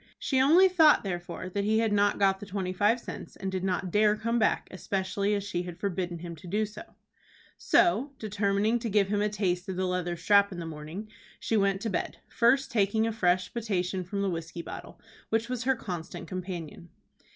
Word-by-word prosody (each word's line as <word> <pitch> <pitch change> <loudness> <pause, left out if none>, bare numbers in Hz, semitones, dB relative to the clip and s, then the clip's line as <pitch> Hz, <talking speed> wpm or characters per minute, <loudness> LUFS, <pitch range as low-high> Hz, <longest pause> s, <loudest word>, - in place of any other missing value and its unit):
She 265 -2 +1
only 335 +8 +7
thought, 325 -5 +5
therefore, 175 -2 -5
that 200 +2 -2
he 215 +2 +2
had 225 -2 +2
not 205 0 +3
got 195 -1 +3
the 205 - -8
twenty 185 -1 -3
five 210 +5 +2
cents, - - -8
and 190 - -4
did 185 -1 -3
not 185 -1 -1
dare 210 +1 +4
to - - -14
come 230 +1 0
back, 220 - +1
especially 195 +2 -1
as 200 - -2
she 180 -3 -2
had 175 -1 -7
forbidden 180 -2 -2
him 170 0 -7
to 170 - -12
do 210 +5 0
so. 210 - -11 0.6
So, 290 -6 +3
determining 210 +2 0
to 230 - -3
give 200 -2 +2
him 205 0 +1
a 210 - +1
taste 190 -3 -1
of 190 - -3
the 185 +1 -1
leather 180 -1 -2
strap 200 +3 +4
in 180 - -7
the 170 - -5
morning, 160 +6 -7 0.3
she 225 - -1
went 195 -2 +2
to 225 - -2
bed, 180 - -2
first 260 +4 +2
taking 220 0 +2
a 225 - -1
fresh 180 -3 +1
potation 190 -5 -1
from 200 +3 -3
the 195 - +1
whiskey 170 0 -5
bottle, - - -9 0.3
which 225 +1 0
was 250 -1 -3
her 265 0 +3
constant 180 -8 -6
companion. 175 -3 -6
200 Hz, 210 wpm, -28 LUFS, 180-220 Hz, 0.6 s, only